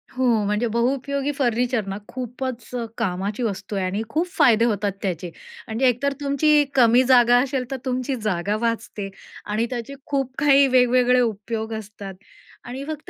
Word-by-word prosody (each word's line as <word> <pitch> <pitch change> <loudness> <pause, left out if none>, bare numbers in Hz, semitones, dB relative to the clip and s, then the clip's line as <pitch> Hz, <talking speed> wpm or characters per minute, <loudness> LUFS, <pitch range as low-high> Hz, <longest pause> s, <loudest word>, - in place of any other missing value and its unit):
हो, 260 0 0 0.2
म्हणजे 210 +3 0
बहुपयोगी 275 +4 0
फर्निचर 245 -3 0
ना 195 +1 -4
खूपच 250 0 -6
अ, 235 -1 -2
कामाची 200 +2 -2
वस्तू 200 -1 -3
आहे 190 -1 -1
आणि 195 +4 -2
खूप 330 +6 0
फायदे 230 -1 +5
होतात 205 -3 0
त्याचे. 180 -2 -3 0.4
म्हणजे 230 +4 +1
एकतर 265 +3 +1
तुमची 290 +1 +3
कमी 245 0 +5
जागा 245 -1 +6
असेल 265 -2 -2
तर 270 - -2
तुमची 255 +1 -1
जागा 205 -2 -1
वाचते 225 -3 -3 0.4
आणि 215 +3 -1
त्याचे 245 +2 -5
खूप 270 -2 -1
काही 280 -2 +5
वेगवेगळे 250 0 +4
उपयोग 220 0 -3
असतात. 210 -2 -7 0.5
आणि 260 +3 -6
फक्त 310 -1 -7
240 Hz, 155 wpm, -23 LUFS, 215-260 Hz, 0.5 s, जागा